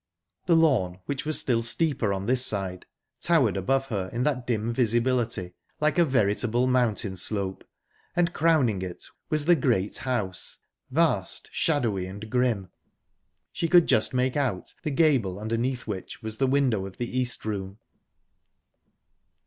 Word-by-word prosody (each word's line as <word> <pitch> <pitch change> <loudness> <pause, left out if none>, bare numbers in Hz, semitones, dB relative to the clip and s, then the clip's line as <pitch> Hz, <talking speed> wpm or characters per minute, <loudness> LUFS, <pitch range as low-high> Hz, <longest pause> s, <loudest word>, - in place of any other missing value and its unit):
The 170 - +5
lawn, 125 - +3
which 140 0 -3
was 155 0 0
still 120 -3 +1
steeper 125 -2 +1
on 95 0 -2
this 125 +2 +3
side, 95 -5 -2 0.3
towered 145 - +2
above 135 +8 +1
her 95 -5 -2
in 120 +2 -1
that 130 -4 -1
dim 115 -1 -1
visibility 115 -5 0 0.3
like 155 +3 +1
a 170 - +6
veritable 120 -1 +1
mountain 120 -6 +1
slope, 95 0 -3 0.5
and 175 0 +1
crowning 145 - +2
it 90 -2 -6 0.2
was 150 -1 +1
the 175 +1 +6
great 120 - 0
house, 110 -8 -2 0.3
vast, - - 0
shadowy, 115 - 0
and 105 +3 -9
grim. 120 -7 +1 0.8
She 165 - -2
could 175 0 +6
just 110 - +2
make 125 0 0
out 130 -11 -2
the 155 - -2
gable 135 - +2
underneath 115 +4 -2
which 105 +2 -6
was 110 0 -5
the 135 - +3
window 130 -8 +1
of 95 - -12
the 120 +1 -4
East 125 -3 -1
Room. 100 -2 -4
120 Hz, 150 wpm, -26 LUFS, 100-135 Hz, 0.8 s, a